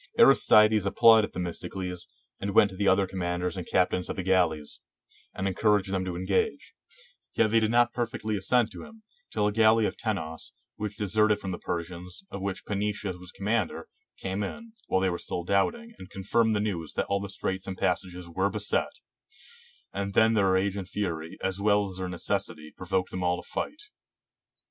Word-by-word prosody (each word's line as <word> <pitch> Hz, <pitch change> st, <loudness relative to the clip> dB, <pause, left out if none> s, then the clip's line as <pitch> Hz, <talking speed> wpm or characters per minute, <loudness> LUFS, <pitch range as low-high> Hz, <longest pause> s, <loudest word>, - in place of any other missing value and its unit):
Aristides 110 Hz, -6 st, +6 dB
applauded 110 Hz, +1 st, +6 dB
Themis 90 Hz, -2 st, -4 dB
tocles, 90 Hz, -2 st, -5 dB, 0.3 s
and 100 Hz, 0 st, -3 dB
went 100 Hz, -, +6 dB
to -, -, -9 dB
the 100 Hz, +1 st, 0 dB
other 95 Hz, 0 st, +4 dB
commanders 90 Hz, -1 st, -2 dB
and 90 Hz, -3 st, -5 dB
captains 90 Hz, 0 st, +1 dB
of -, -, -3 dB
the 95 Hz, -, -3 dB
galleys, 90 Hz, -5 st, +1 dB, 0.5 s
and 95 Hz, -, -3 dB
encouraged 100 Hz, 0 st, +2 dB
them 95 Hz, -1 st, 0 dB
to 90 Hz, -2 st, -4 dB
engage; 95 Hz, +2 st, -1 dB, 0.6 s
yet 110 Hz, -2 st, +3 dB
they 115 Hz, -, +5 dB
did 110 Hz, -1 st, +1 dB
not 120 Hz, +1 st, +3 dB
perfectly 110 Hz, -2 st, -2 dB
assent 110 Hz, +4 st, +2 dB
to -, -, -9 dB
him, 225 Hz, -1 st, -14 dB, 0.3 s
till 105 Hz, -, 0 dB
a 105 Hz, -, +2 dB
galley 110 Hz, +1 st, +4 dB
of -, -, -2 dB
Tenos, 80 Hz, -8 st, -4 dB, 0.2 s
which 105 Hz, -1 st, -5 dB
deserted 105 Hz, 0 st, +2 dB
from 95 Hz, -2 st, -5 dB
the 90 Hz, -, -5 dB
Persians, 90 Hz, -, -5 dB
of 100 Hz, -, -6 dB
which 100 Hz, 0 st, -4 dB
Pansetius 105 Hz, -2 st, -2 dB
was 90 Hz, 0 st, -6 dB
commander, 105 Hz, -1 st, -2 dB, 0.3 s
came 95 Hz, +2 st, -3 dB
in, 230 Hz, -, -6 dB
while 95 Hz, -, +1 dB
they 95 Hz, -, +2 dB
were 85 Hz, -, -3 dB
still 85 Hz, -, -4 dB
doubting, 225 Hz, -, 0 dB
and 95 Hz, -, -10 dB
confirmed 110 Hz, +3 st, +1 dB
the -, -, +1 dB
news 90 Hz, -7 st, -3 dB
that -, -, -1 dB
all 100 Hz, -, 0 dB
the 100 Hz, 0 st, -6 dB
straits 95 Hz, -1 st, -3 dB
and 95 Hz, -1 st, -5 dB
passages 90 Hz, -1 st, -2 dB
were 95 Hz, +4 st, 0 dB
beset; 105 Hz, 0 st, -1 dB, 1.0 s
and 100 Hz, 0 st, -3 dB
then 110 Hz, +1 st, +5 dB
their 100 Hz, -4 st, +3 dB
rage 95 Hz, +1 st, +1 dB
and 95 Hz, -2 st, -5 dB
fury, 85 Hz, -5 st, -3 dB
as 95 Hz, 0 st, -1 dB
well 100 Hz, -1 st, +2 dB
as 95 Hz, -, -8 dB
their 95 Hz, -1 st, -3 dB
necessity, 90 Hz, -3 st, -3 dB
provoked 95 Hz, 0 st, -2 dB
them 95 Hz, -, -3 dB
all 90 Hz, 0 st, +1 dB
to 90 Hz, -, -12 dB
fight. 305 Hz, +5 st, -4 dB
95 Hz, 190 wpm, -28 LUFS, 90-105 Hz, 1.0 s, Aristides